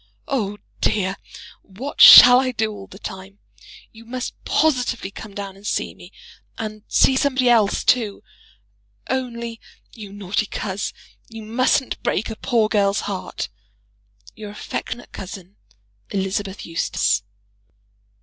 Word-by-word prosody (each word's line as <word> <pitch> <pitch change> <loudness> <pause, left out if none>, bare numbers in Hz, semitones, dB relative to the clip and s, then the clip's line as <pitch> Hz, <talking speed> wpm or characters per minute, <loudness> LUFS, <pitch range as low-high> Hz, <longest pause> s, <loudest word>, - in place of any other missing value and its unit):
Oh, 210 -7 -2 0.2
dear, 195 -2 0 0.5
what 240 +9 -6
shall 245 0 +11
I 260 -1 0
do 220 -1 -1
all 200 -2 -10
the 195 - -13
time? 195 0 -9 0.5
You 225 +1 -15
must 250 +2 -5
positively 250 -9 0
come 205 0 -10
down 200 -1 -6
and 200 +2 -10
see - - -2
me, - - -15 0.5
and 215 -1 -6
see 265 - +4
somebody 260 -2 +2
else 220 -4 +3
too! 220 -5 +1 0.9
Only, 235 -3 -4 0.3
you 210 -4 -10
naughty 200 +1 -2
coz! 195 0 -4 0.4
you 225 -1 -9
mustn't 255 +4 0
break 220 +4 -1
a - - -5
poor 230 -2 +1
girl's 200 -1 +1
heart. 195 -2 -5 0.9
Your 215 -1 -9
affectionate 210 +3 -6
cousin, 190 0 -9 0.5
ELI. 195 -1 -1 0.3
EUSTACE. 100 -11 0
215 Hz, 125 wpm, -21 LUFS, 195-245 Hz, 0.9 s, shall